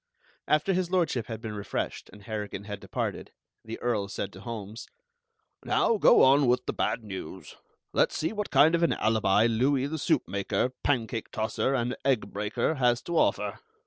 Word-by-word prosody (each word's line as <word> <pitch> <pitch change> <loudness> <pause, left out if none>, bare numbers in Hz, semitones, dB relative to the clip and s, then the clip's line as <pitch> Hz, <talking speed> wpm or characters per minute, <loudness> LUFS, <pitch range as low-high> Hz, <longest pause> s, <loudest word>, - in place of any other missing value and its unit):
After 155 +6 +2
His 180 -1 0
Lordship 165 - 0
had 110 -2 -6
been 110 -2 -5
refreshed 105 -1 -4
and 105 - -15
Harrigan 105 -2 -5
had 105 0 -6
departed, - - -4 0.3
the 110 0 -6
Earl 110 -5 -1
said 100 -1 -5
to 95 - -11
Holmes: 110 -1 -7 0.8
"Now 230 - +2
go - - +6
on 135 +1 +5
with 125 +1 +2
the - - -2
bad 115 - -1
news. 95 -3 -8 0.4
Let's - - +2
see 160 +6 -1
what 210 -1 -3
kind 155 +3 +5
of 170 - +2
an 170 - +3
alibi 110 -1 +2
Louis 130 +4 +2
the 155 +2 -4
soup 155 -2 +1
maker, 100 +5 -1
pancake 115 -4 -1
tosser, 110 +5 -1
and 125 0 -1
egg 130 -5 0
breaker, 105 +9 -1
has 120 +1 +3
to 170 - -4
offer." - - 0
120 Hz, 175 wpm, -28 LUFS, 105-145 Hz, 0.8 s, go